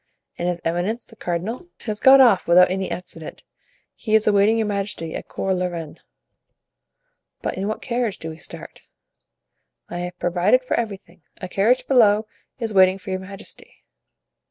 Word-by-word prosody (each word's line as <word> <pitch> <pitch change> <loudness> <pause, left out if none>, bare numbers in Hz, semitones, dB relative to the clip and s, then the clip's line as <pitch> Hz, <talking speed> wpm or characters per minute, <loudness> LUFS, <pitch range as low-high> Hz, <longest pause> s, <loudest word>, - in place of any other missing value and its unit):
"And 175 - 0
his 175 -1 -2
eminence, 180 +8 -1
the 225 - -18
cardinal?" 205 - -4
"Has 215 -2 -4
got 270 +1 +8
off 235 -8 +5
without 180 +2 +6
any 190 0 -2
accident. 165 -3 -8 0.5
He 220 -1 -1
is 220 - +4
awaiting 210 +2 +4
your 225 - +1
majesty 200 -5 -4
at - - -6
Cours 190 -1 -2
la 180 - 0
Reine." 165 -4 -7 1.4
"But - - -2
in 195 +2 -3
what 215 - -4
carriage 240 -4 -1
do 160 - -7
we 160 - -10
start?" - - -9 1.0
"I 175 - -5
have 180 0 -5
provided 180 +9 +2
for 255 - -3
everything; 195 -6 -4 0.2
a 185 - -6
carriage 215 +7 +2
below 220 -5 +4 0.3
is 225 -3 -3
waiting 190 -1 +5
for 195 0 -8
your 185 - -1
majesty." 200 - -11
195 Hz, 165 wpm, -22 LUFS, 180-220 Hz, 1.4 s, got